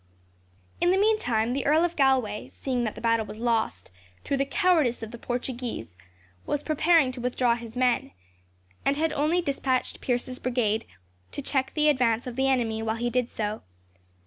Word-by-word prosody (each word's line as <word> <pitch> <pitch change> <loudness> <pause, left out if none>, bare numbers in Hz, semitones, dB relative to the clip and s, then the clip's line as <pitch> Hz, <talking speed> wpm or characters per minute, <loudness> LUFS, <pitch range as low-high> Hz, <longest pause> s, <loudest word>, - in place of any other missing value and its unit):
In 350 - +4
the 375 - +4
meantime 250 - +2
the 270 0 -1
Earl 315 +4 +4
of 345 0 -3
Galway, 260 -7 +1
seeing 250 -3 -2
that 215 - -3
the - - -9
battle 230 -1 +2
was - - -8
lost, 225 - -1 0.3
through 280 - -1
the 275 - +1
cowardice 310 - +2
of 225 - -6
the 235 - -9
Portuguese, 245 - -4 0.5
was 290 - -1
preparing 310 -2 +3
to 255 -1 -8
withdraw 250 -1 +2
his 235 0 -7
men, 250 -1 +2 0.7
and 280 +1 +1
had 320 0 +1
only 315 +5 +1
despatched 270 -4 -1
Pierce's 255 0 -2
brigade 235 -4 0 0.5
to 285 - -5
check 265 -1 0
the 305 -1 +3
advance 245 -5 +2
of 250 -2 -6
the 265 +1 +1
enemy 230 -4 +1
while 225 0 -1
he 240 +1 -2
did 250 -1 0
so. 210 0 -3
250 Hz, 175 wpm, -26 LUFS, 230-280 Hz, 0.7 s, In